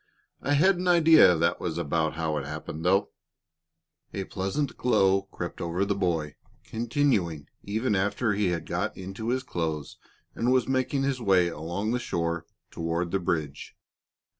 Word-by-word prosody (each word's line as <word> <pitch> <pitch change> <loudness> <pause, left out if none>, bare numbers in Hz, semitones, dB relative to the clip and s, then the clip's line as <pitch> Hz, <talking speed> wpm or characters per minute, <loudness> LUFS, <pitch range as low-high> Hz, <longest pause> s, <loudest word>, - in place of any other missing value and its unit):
"I 145 - 0
had 180 +6 +4
an 180 +1 -3
idea 165 - +7
that 80 +1 +1
was - - -3
about 80 -1 0
how 80 -1 -1
it 70 - -3
happened, 75 +2 -6
though." 95 +3 +2 1.0
A 100 - -2
pleasant 95 +10 -3
glow 95 -5 +2
crept 85 - -6
over 85 +3 -1
the 100 - 0
boy, 85 -6 -1 0.3
continuing 110 - 0
even 110 +3 -1
after 105 +3 0
he 100 -1 +1
had 85 -3 -2
got - - -2
into 95 +4 -5
his 130 +1 0
clothes 80 - -4 0.3
and 120 +2 0
was 130 -2 +3
making 130 +1 0
his 135 -2 -1
way 95 -5 +3
along 85 +7 -3
the 125 - 0
shore 85 -5 -2 0.2
toward 85 +1 -2
the 95 - +1
bridge. 80 -5 -3
95 Hz, 160 wpm, -27 LUFS, 85-120 Hz, 1.0 s, idea